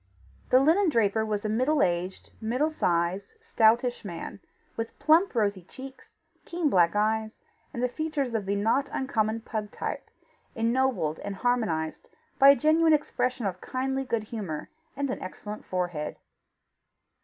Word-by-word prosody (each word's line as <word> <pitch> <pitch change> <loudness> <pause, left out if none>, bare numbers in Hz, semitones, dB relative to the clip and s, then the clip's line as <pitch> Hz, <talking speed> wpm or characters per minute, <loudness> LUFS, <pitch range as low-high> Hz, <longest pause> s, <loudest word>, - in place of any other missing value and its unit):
The 255 - +6
linen 330 +7 +4
draper 220 -5 +2
was 215 -1 -2
a - - +2
middle 255 +8 +2
aged, 180 +1 -2
middle 250 +8 0
sized, 180 - 0
stoutish 240 - +2
man, 175 0 -7 0.4
with 225 0 -5
plump 325 +1 +3
rosy 205 -4 +1
cheeks, 265 +9 -12 0.3
keen 335 -4 -1
black 175 0 +4
eyes, 220 +1 0 0.3
and 245 +1 -1
features 295 -3 -2
of 210 -4 -2
the 200 - +1
not 225 +8 +1
uncommon 225 -4 -1
pug 215 -2 -4
type, - - -5 0.5
ennobled 230 -9 0
and 200 -1 -5
harmonized 190 -9 -1 0.3
by 275 0 +9
a 280 - +8
genuine 315 +2 +4
expression 255 -5 0
of 185 -2 -3
kindly 265 +1 -2
good 230 -4 -1
humour, 200 -9 -6 0.3
and 280 -2 -1
an - - -5
excellent 210 +3 -7
forehead. 175 -5 -3
225 Hz, 145 wpm, -27 LUFS, 200-270 Hz, 0.5 s, by